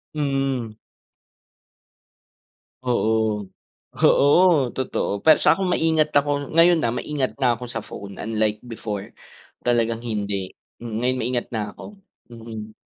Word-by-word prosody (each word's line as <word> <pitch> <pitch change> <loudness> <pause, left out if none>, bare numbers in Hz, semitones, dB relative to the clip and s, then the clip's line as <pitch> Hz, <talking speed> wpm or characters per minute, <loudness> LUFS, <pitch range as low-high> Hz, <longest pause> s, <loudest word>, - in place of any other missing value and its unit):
Mm. 135 -5 -1 2.1
Oo. 110 -4 +1 0.5
Oo, 145 -2 +4
totoo 130 -5 -2
para 155 -1 +8
sa - - +6
kom 190 -1 -1
maingat 160 -2 +2
ako 145 0 +2 0.3
ngayon, 170 0 +6
ah, 115 - -1
maingat 145 -4 -2
na 130 - +3
ako - - -7
sa 115 -3 -5
phone 100 -1 -9
unlike 110 -1 0
before. 105 -4 -6 0.5
Talagang 115 -1 +1
hindi, 100 -4 -3 0.3
mm, 115 -2 -6
ngayon 125 +1 0
naingat 120 +1 -1
na 110 - -1
ako, - - -11 0.5
mm. 110 -2 -8
120 Hz, 120 wpm, -23 LUFS, 110-140 Hz, 2.1 s, para